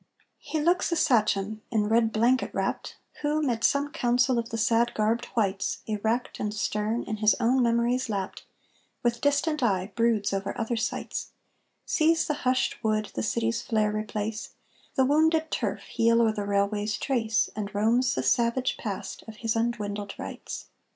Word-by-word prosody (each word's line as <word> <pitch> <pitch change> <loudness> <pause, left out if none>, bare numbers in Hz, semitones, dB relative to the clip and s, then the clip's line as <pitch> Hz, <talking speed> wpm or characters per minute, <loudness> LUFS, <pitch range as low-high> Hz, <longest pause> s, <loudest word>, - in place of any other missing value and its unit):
He 315 - -3
looks 350 +4 +2
a - - +2
sachem, 215 -7 +2
in 215 -3 +1
red 225 +1 +3
blanket 240 +4 +2
wrapt, - - -2 0.2
Who, 300 +1 +1
mid 235 -5 -1
some 285 +1 +2
council 250 -3 +2
of 230 0 -4
the 225 - -3
sad 230 +1 +2
garbed 220 +3 +1
whites, 195 -4 0
Erect 220 +3 -2
and 210 - -1
stern, 210 +2 -1
in 215 - -4
his 215 0 +4
own 255 +3 +3
memories 235 +1 +1
lapt, 195 -2 -3 0.6
With 235 -1 0
distant 290 +2 +1
eye 195 -4 +1
broods 230 -4 +1
over 195 +3 -3
other 230 +1 -1
sights, 225 - -3 0.5
Sees 320 0 +2
the 300 - 0 0.2
hushed 255 0 0
wood 215 -1 0
the - - -2
city's 230 0 0
flare 215 -2 +1
replace, 215 +4 -4 0.4
The 265 - +4
wounded 315 +3 +3
turf - - -2
heal 230 0 +2
o'er 225 - +3
the 210 -2 -4
railway's 205 +1 0
trace, 225 -5 0
And 210 -1 -3
roams 230 +5 +2
the 130 - -1
savage 235 - +1
Past 205 -5 -5
of 220 - -9
his 225 0 -2
undwindled 210 -3 -2
rights. - - -7
230 Hz, 165 wpm, -27 LUFS, 210-250 Hz, 0.6 s, his